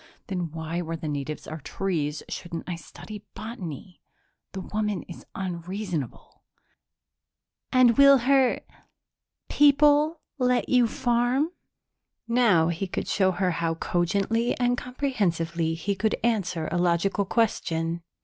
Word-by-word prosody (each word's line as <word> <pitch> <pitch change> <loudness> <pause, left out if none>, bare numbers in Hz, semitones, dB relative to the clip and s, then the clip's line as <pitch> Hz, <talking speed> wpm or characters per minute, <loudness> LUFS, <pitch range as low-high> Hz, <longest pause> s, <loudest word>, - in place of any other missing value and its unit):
Then 180 -3 -2
why, 160 +2 -4
where 165 -1 -4
the 155 - -6
natives 145 +1 -4
are 155 +1 -6
trees, 155 -4 -2
shouldn't 170 -2 -6
I 180 - -2
study 210 +5 -10
botany? 180 - -7 0.5
The 190 - -4
woman 210 -1 -2
is 175 - -12
unreasonable._ 180 - -5 1.3
"And 250 -2 +5
will 275 0 +9
her 260 0 +3 0.9
people 295 +2 +4 0.2
let 250 -1 +2
you 250 -2 +4
farm?" 245 +6 +1 0.8
Now 225 -9 +4
he 175 +3 -2
could - - -4
show 190 -2 +2
her 185 0 0
how 165 -1 -1
cogently 200 +8 0
and 245 0 +2
comprehensively 170 - -1
he 200 +5 -2
could 210 +3 0
answer 180 -8 0
a 175 - 0
logical 175 +3 +2
question. 170 -6 0
190 Hz, 120 wpm, -26 LUFS, 170-240 Hz, 1.3 s, will